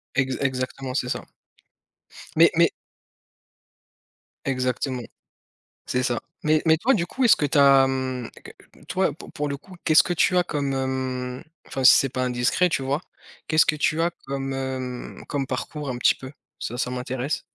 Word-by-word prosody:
Ex 130 -1 +1
exactement, 130 -1 -2
c'est 125 -2 -1
ça. - - -3 1.1
Mais - - +6
mais - - +5 1.8
Exactement. 130 0 -1 0.9
C'est 125 - 0
ça. 120 -2 0 0.2
Mais 155 0 +3
mais 160 -1 +5
toi 250 +12 +2
du 175 -6 0
coup, 260 +6 -1
est-ce 230 - +8
que - - -1
tu 145 +1 +1
as, 140 -1 +7
hem 130 -2 -2
q - - -13 0.3
n - - -18
toi, 185 -4 0
pour 150 - -12
pour 150 0 -2
le 140 - -3
coup, 185 +6 -15
qu'est-ce 155 -1 +6
que 175 - -1
tu 180 +2 +2
as 180 - +4
comme, 140 -4 -2
hem, 130 -1 -3 0.2
enfin 135 - -4
si 130 - +9
c'est 135 - +2
pas 130 0 -3
indiscret, 125 +8 +2
tu 145 - -1
vois? 140 +3 0 0.5
Qu'est-ce 155 -1 +4
que 155 - +2
tu 155 +1 +1
as 170 +1 +2 0.2
comme, 135 0 -3
hem, 130 -2 -5
comme 140 -2 -2
parcours 145 +3 -4
un 125 - -4
petit - - +4
peu? 130 0 -10 0.3
Ça 120 - -4
ça 125 - -1
m'intéresse. 125 +3 -3
135 Hz, 180 wpm, -24 LUFS, 130-150 Hz, 1.8 s, si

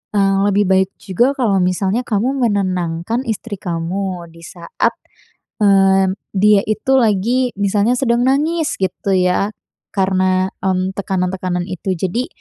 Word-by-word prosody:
eee, 195 -1 +3
lebih 205 +1 +2
baik 190 0 +3
juga 240 +9 +1
kalau 215 -6 +2
misalnya 190 +6 0
kamu 245 +6 -1
menenangkan 185 +2 -1
istri 220 -1 -4
kamu 175 +1 -3
di 165 0 -16
saat, 170 -1 -2 0.7
mmm, 195 -1 +4 0.2
dia 205 +1 +5
itu 215 +5 -1
lagi 235 +4 +1
misalnya 205 +4 +2
sedang 240 -2 +1
nangis 305 +4 +1
gitu 190 +1 -1
ya, 180 +2 +1 0.4
karena 185 -1 +1
m 185 0 0
tekanan-tekanan 185 -2 -2
itu, 185 +1 -3
jadi 190 +9 -2
195 Hz, 125 wpm, -18 LUFS, 185-220 Hz, 0.7 s, dia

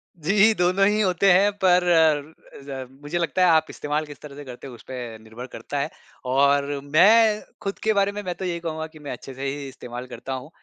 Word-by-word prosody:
जी। 195 +7 +4
दोनों 185 +2 +3
ही 210 +1 +2
होते 190 0 +3
हैं 195 +3 +5
पर 180 -1 +5
अ, 160 -4 +1
ज 135 -2 -6
मुझे 150 +4 -3
लगता 175 +2 0
है 180 - +6
आप 160 - +3
इस्तेमाल 150 +1 -3
किस 145 -2 -12
तरह 145 -2 -10
से 145 - -9
करते 125 +1 -9
हो 130 - -10
उसपे 120 -2 -8
निर्भर 110 +3 -9
करता 130 +4 -5
है। 140 - -1 0.4
और 140 +2 +2
मैं 210 +8 +5 0.2
खुद 195 0 -4
के 220 0 +3
बारे 200 0 +2
में 205 0 -5
मैं 180 -1 -4
तो 190 - -5
यही 170 -1 -2
कहूँगा 160 -1 -4
कि 155 -1 -16
मैं 145 - -7
अच्छे 130 +2 -8
से 135 +2 -6
ही 140 +1 -4
इस्तेमाल 125 -1 -8
करता 135 +1 -7
हूँ। 130 +3 -6
155 Hz, 225 wpm, -24 LUFS, 135-185 Hz, 0.4 s, है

